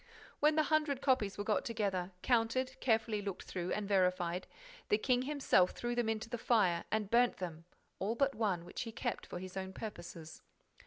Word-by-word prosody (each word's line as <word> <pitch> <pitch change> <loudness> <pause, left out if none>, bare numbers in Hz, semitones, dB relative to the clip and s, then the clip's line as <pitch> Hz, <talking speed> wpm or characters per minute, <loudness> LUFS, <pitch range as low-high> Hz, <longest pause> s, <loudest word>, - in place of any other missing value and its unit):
When 300 +1 +4
the 310 - +4
hundred 305 -3 +1
copies 255 -8 +1
were 205 - -2
got 210 0 +1
together, 195 -5 -1
counted, 255 +2 +2
carefully 225 -3 +1
looked 200 -2 -5
through 180 -1 -4
and 210 -1 -2
verified, 180 -2 +1 0.4
the 210 - +5
king 250 +3 +2
himself 265 -10 +3
threw 240 0 -3
them 240 -2 0
into 220 0 -2
the 240 0 -4
fire 190 -8 +2
and 215 -2 -1
burnt 240 +1 +4
them, 165 -3 -6 0.3
all 210 +4 -1
but 275 +2 +2
one, 195 -6 -1
which 175 - -6
he 230 - -4
kept 235 +1 -3
for - - -6
his 185 +1 -8
own 190 0 -4
purposes. 175 -6 -8
215 Hz, 190 wpm, -35 LUFS, 185-245 Hz, 0.4 s, the